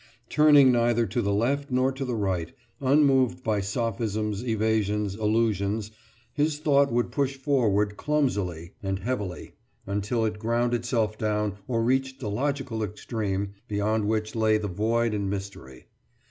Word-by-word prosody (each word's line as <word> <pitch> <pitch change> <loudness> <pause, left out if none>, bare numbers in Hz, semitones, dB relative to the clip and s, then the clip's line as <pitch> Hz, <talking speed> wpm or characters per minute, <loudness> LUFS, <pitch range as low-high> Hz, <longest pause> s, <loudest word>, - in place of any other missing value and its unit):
Turning 145 -3 +6
neither 120 -1 +2
to 110 +4 -1
the 100 -2 0
left 135 +8 0
nor 130 +1 +2
to 135 +1 -5
the 125 -2 -2
right, 95 -6 -2 0.3
unmoved 135 -2 +3
by 105 -2 0
sophisms, 105 0 -2
evasions, 105 -3 0
allusions, 105 -1 0 0.4
his 150 0 0
thought 140 -3 +3
would 120 +1 0
push 140 -1 0
forward 105 -8 +1
clumsily 100 - -1
and 95 -1 -2
heavily 100 -3 -4 0.3
until 105 +4 -1
it 105 -1 -3
ground 120 +2 0
itself 115 -3 -1
down 105 -1 0
or 115 -2 0
reached 130 +2 0
the 105 -5 -4
logical 135 -1 -2
extreme 100 -2 -3
beyond 105 +1 0
which 110 0 -1
lay 110 -1 +3
the 105 -1 -3
void 115 +4 0
and 100 -2 -1
mystery. 95 -10 -7
110 Hz, 145 wpm, -26 LUFS, 105-125 Hz, 0.4 s, Turning